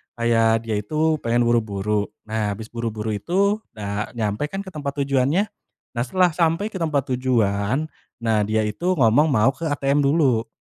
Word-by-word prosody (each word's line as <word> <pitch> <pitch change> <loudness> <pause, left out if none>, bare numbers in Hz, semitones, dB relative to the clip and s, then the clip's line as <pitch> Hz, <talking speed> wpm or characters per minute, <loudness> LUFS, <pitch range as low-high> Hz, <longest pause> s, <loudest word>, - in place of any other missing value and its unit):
kayak 115 -1 +2
dia 110 -2 -1
itu 155 +7 0
pengen 120 +1 +2
buru-buru, 105 -3 0 0.2
nah 110 -1 -1
habis 110 +2 -10
buru-buru 110 -2 -3
itu 195 - +1 0.2
udah 105 0 -4
nyampai 110 +4 -1
kan 195 +5 -5
ke 190 - -10
tempat 145 -4 -4
tujuannya. 140 +7 +2 0.5
Nah, 120 -1 -1
setelah 180 +5 +3
sampai 165 +6 0
ke 190 - -5
tempat 155 -5 0
tujuan, 120 0 +1 0.4
nah 110 -2 +2
dia 110 0 +1
itu 170 - -1
ngomong 130 +2 +4
mau 135 -3 +3
ke 165 +3 -5
ATM 145 -1 +1
dulu 135 -7 +2
120 Hz, 165 wpm, -22 LUFS, 110-155 Hz, 0.5 s, ngomong